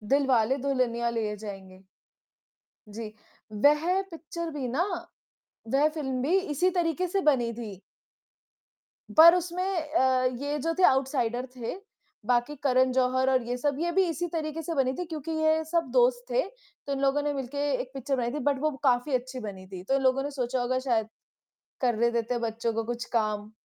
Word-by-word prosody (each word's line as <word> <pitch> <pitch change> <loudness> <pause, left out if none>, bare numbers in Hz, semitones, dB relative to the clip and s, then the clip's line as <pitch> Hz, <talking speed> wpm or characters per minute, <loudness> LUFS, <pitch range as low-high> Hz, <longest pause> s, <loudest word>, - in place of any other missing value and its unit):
दिलवाले 265 -3 +2
दुल्हनिया 235 -3 +1
ले 220 -3 -2
जाएँगे। 190 -2 -9 1.1
जी। 215 0 -6 0.4
वह 300 - +3
पिक्चर 335 +1 -6
भी 275 -4 -3
ना 270 +8 0 0.9
वह 285 +3 +5
फ़िल्म 270 -5 -3
भी 320 +9 +3
इसी 355 0 0
तरीके 345 +1 +1
से 390 +3 0
बनी 260 -8 +2
थी। 215 -5 -8 1.4
पर 335 +2 +10
उसमें 360 0 -2
अ, 300 -8 +1
ये 280 +4 -1
जो 330 +4 -1
थे - - +3
आउटसाइडर 260 -4 +2
थे, 240 +3 -4 0.5
बाकी 245 +4 +1
करन 260 -1 +3
ज़ोहर 260 0 +2
और 260 -2 +2
ये 245 +1 -2
सब, 285 +2 0
ये 345 +1 0
भी 380 +2 +3
इसी 340 +2 -2
तरीके 315 -1 -3
से 330 +2 -4
बनी 260 -2 +2
थी 360 - -2
क्योंकि 320 -1 -6
ये 315 0 +2
सब 330 -3 0
दोस्त 245 -1 +3
थे 245 - +3 0.5
तो 280 - -1
इन 275 - -2
लोगों 275 +1 +2
ने 295 0 0
मिल 270 -3 -4
के 285 +2 -2
एक 255 0 -9
पिक्चर 270 +1 -2
बनाई 240 -2 -1
थी 300 - -2
बट 275 -2 -1
वो 310 0 +1
काफ़ी 255 +1 +2
अच्छी 255 +1 -4
बनी 195 -4 -8
थी, 185 -1 -8
तो 265 +8 +1
इन 275 - +1
लोगों 265 +1 +2
ने 285 - -4
सोचा 255 -2 -2
होगा 255 +1 0
शायद, 235 -5 0 0.7
करने 235 -2 +2
देते 235 +1 -1
हैं 240 - -2
बच्चों 230 0 -2
को 225 +1 -1
कुछ 240 +1 -4
काम, 215 -2 -1
260 Hz, 185 wpm, -27 LUFS, 240-305 Hz, 1.4 s, पर